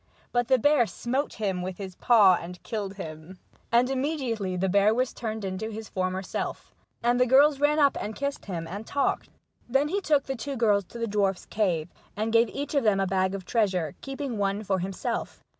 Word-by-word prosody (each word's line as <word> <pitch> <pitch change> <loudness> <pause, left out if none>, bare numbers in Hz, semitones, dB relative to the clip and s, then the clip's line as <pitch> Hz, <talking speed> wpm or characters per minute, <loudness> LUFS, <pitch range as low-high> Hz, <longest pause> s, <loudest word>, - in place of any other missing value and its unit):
But 245 -1 +1
the 260 - +5
bear 270 -1 +4
smote 260 +7 -2
him 195 -4 -2
with 180 0 -5
his 190 -2 -6
paw 205 -2 +5
and 180 +1 -9
killed 205 -4 -4
him, 160 0 -8 0.3
and 240 +2 +4
immediately 260 -8 -1
the 190 +2 +1
bear 200 +3 +4
was 255 +1 0
turned 220 -3 -4
into 190 +3 -3
his 220 -1 -7
former 185 0 -2
self, - - -5 0.3
and 240 +1 +3
the 250 - +4
girls 275 +3 +5
ran 295 +1 +3
up 285 -2 +4
and 215 +1 -4
kissed 280 0 -3
him, 170 -4 -4
and 200 +5 -7
talked. 280 - 0 0.4
Then 270 +4 +2
he 400 +4 0
took 295 -6 +2
the 270 - -4
two 275 +3 -5
girls 210 -5 +2
to 235 - -11
the 230 - -1
dwarf's 200 -3 0
cave, 175 -7 0 0.3
and 220 +2 -1
gave 230 0 +5
each 285 +6 -5
of 280 -3 +2
them 210 -3 +3
a 195 - +2
bag 190 0 0
of 190 -2 -7
treasure, 185 - 0
keeping 270 -4 -4
one 200 +1 0
for 190 -2 0
himself. 190 +1 -4
215 Hz, 210 wpm, -27 LUFS, 190-255 Hz, 0.4 s, the